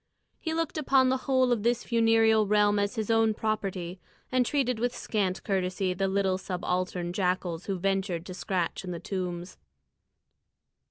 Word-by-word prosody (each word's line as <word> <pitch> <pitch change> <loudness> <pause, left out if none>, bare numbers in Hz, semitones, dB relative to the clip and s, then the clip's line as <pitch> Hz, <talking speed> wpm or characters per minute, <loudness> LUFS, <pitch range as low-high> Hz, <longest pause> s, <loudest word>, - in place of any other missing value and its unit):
He 320 -1 -3
looked 330 -1 -1
upon 265 -3 +4
the 260 - +2
whole 260 -2 +4
of 235 -3 +1
this 235 +2 +1
funereal 225 -2 +3
realm 205 0 +3
as 205 +3 -1
his 220 -1 -1
own 225 -1 +3
property, 195 -5 -3 0.3
and 255 -1 +3
treated 250 -3 0
with 245 +1 -1
scant 195 -6 -1
courtesy 185 -1 0
the 195 +2 0
little 190 -1 +1
subaltern 180 -1 -2
jackals 180 -2 -1
who 195 -2 -1
ventured 190 -2 -1
to 185 - -7
scratch 180 -1 -2
in 185 - -6
the 175 -1 -4
tombs. 180 -1 -4
200 Hz, 160 wpm, -28 LUFS, 185-225 Hz, 0.3 s, upon